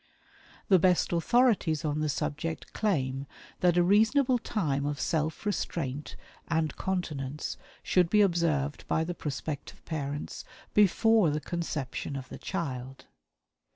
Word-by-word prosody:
The 190 -2 +6
best 180 0 +3
authorities 175 - +3
on 150 0 0
the 155 0 0
subject 150 +3 -3
claim 140 -10 0 0.3
that 180 -1 +3
a 175 - +5
reasonable 225 +7 +4
time 150 -12 -1
of 145 0 -2
self 160 +4 -1
restraint 150 -8 -3 0.3
and 160 -2 0
continence 150 -7 -3 0.3
should 180 -2 +3
be 210 +2 +5
observed 165 -7 +1
by 160 - +1
the 175 +2 -3
prospective 145 -2 -5
parents 145 -2 -4 0.3
before 210 -1 +5
the 150 +1 0
conception 150 -4 -4
of 130 -1 -6
the - - -8
child. 135 -7 -4
160 Hz, 125 wpm, -29 LUFS, 145-185 Hz, 0.3 s, The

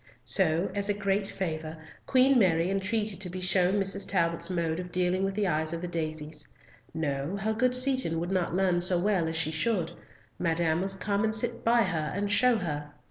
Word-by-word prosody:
So, 160 +7 +4
as 200 0 -1
a 205 - +1
great 200 0 0
favour, 160 -4 -4 0.3
Queen 260 0 +4
Mary 175 -3 +2
entreated 205 +1 -1
to 185 - -4
be 185 +1 -6
shown 185 +1 +2
Mrs. 195 0 -1
Talbot's 170 -2 0
mode 170 -2 -1
of 180 -1 -7
dealing 180 +1 0
with 195 0 -1
the 210 -1 0
eyes 155 -1 0
of 170 +1 -5
the - - -2
daisies. 155 -2 -5 0.4
No, 150 +3 -3
her 215 +2 -1
good 250 +3 +1
Seaton 255 -10 +2
would 175 +2 -3
not 180 -2 -1
learn 180 -2 +2
so 180 0 +3
well 180 -2 +1
as 160 - -3
she 160 -1 0
should; 170 0 -1 0.5
Madame 165 -1 +1
must 195 0 -1
come 205 +1 0
and 220 0 +1
sit 235 +1 -1
by 235 0 +4
her 160 -6 -2
and 200 +1 -2
show 245 +3 +4
her. 150 -6 -5
185 Hz, 200 wpm, -28 LUFS, 165-200 Hz, 0.5 s, So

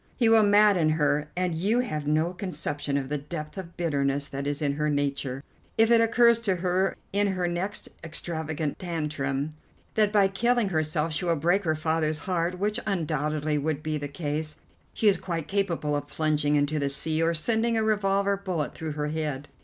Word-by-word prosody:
He 235 - +2
will 225 -1 +7
madden 205 -5 +5
her, 150 0 +1
and 180 -1 0
you 205 +9 +1
have 155 -12 -4
no 155 +4 +1
conception 145 -7 -3
of 135 -2 -2
the 150 0 -1
depth 155 +1 -7
of 180 -3 -8
bitterness 140 -4 0
that 140 +1 -4
is 145 0 -1
in 145 -2 0
her 150 +1 0
nature. 140 -2 -1 0.3
If 225 +1 +4
it 230 -1 +6
occurs 235 0 +5
to 200 -5 +1
her 185 +2 0 0.2
in 205 +1 +2
her 185 -2 0
next 175 +4 -2 0.2
extravagant 160 -2 -3
tantrum 150 -4 -2 0.4
that 215 -2 +3
by 205 -2 +5
killing 235 +2 +1
herself 155 -1 0
she 155 - -2
will 170 -1 +2
break 175 +6 +1
her 155 -1 +2
father's 155 0 0
heart, 180 -1 0
which 210 +3 -1
undoubtedly 155 -4 0
would 155 0 -2
be 155 -1 -2
the 145 - -4
case, 150 +1 -3 0.3
she 220 - 0
is 195 -3 +4
quite 165 -4 -4
capable 175 -7 0
of 145 0 -3
plunging 150 -1 +1
into 145 +1 +1
the 140 -1 0
sea, 155 +3 +1
or 165 +1 +2
sending 230 +7 +1
a 220 - +2
revolver 200 -2 +2
bullet 185 -6 -3
through 160 -2 -5
her 150 0 -2
head. 150 -3 -3
160 Hz, 190 wpm, -27 LUFS, 150-195 Hz, 0.4 s, will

